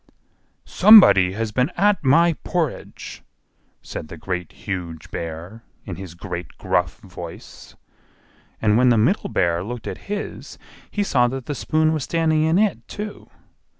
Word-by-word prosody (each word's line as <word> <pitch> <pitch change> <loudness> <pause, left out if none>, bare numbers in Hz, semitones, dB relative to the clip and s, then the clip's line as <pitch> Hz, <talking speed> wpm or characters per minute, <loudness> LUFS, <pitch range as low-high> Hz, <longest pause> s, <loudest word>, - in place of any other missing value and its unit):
"SOMEBODY 185 - +7
HAS 110 +1 -3
BEEN 125 +6 +1
AT 205 -3 +2
MY 165 +5 +4
PORRIDGE!" 165 -6 -4 0.6
said - - -7
the 80 - -10
Great, 90 +1 -4
Huge 85 -5 -6
Bear, 85 +7 -7 0.2
in 95 -5 -6
his 90 -3 -9
great 85 0 -7
gruff - - -1
voice. - - -11 0.8
And 110 +1 +3
when 125 0 +5
the 120 - +4
Middle 125 - +1
Bear 85 0 0
looked 120 +1 -7
at - - -8
his, 205 0 -5 0.3
he 205 - -1
saw 125 -10 +2
that 130 0 -5
the 145 - -3
spoon 155 +4 +1
was 155 -3 -2
standing 160 -1 +1
in 160 +2 +2
it, 210 0 0
too. 210 0 -7
125 Hz, 150 wpm, -22 LUFS, -, 0.8 s, SOMEBODY